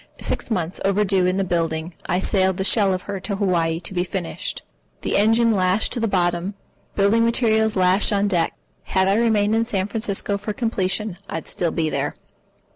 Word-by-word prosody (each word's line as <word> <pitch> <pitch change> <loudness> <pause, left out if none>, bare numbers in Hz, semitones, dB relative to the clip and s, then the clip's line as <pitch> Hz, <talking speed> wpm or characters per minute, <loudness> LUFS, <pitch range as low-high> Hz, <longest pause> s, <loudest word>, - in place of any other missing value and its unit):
Six - - -3
months 180 -6 -2
overdue 195 -2 +2
in 185 +1 0
the 195 - +1
building, 165 -2 -2
I 180 - +1
sailed 190 -1 +1
the 190 - -1
shell 200 0 +3
of 185 -1 -2
her 200 -1 -5
to 200 +2 -3
Hawaii 170 -5 0
to - - -4
be 175 -1 0
finished, 180 -1 -4 0.4
the - - -1
engine 225 +3 +4
lashed 185 +1 +1
to - - -2
the 225 - +1
bottom, 180 0 0 0.4
building 205 +3 +3
materials 220 -2 +2
lashed 185 +2 +3
on 200 0 +2
deck. 175 -4 0 0.3
Had 190 0 +1
I 195 - +3
remained 215 -1 +2
in 225 - +2
San 200 -5 -2
Francisco 205 -2 -2
for 210 - -4
completion, 210 -3 -1
I'd 160 - -5
still 175 - 0
be 160 -1 -1
there. - - -2
195 Hz, 190 wpm, -22 LUFS, 180-215 Hz, 0.4 s, engine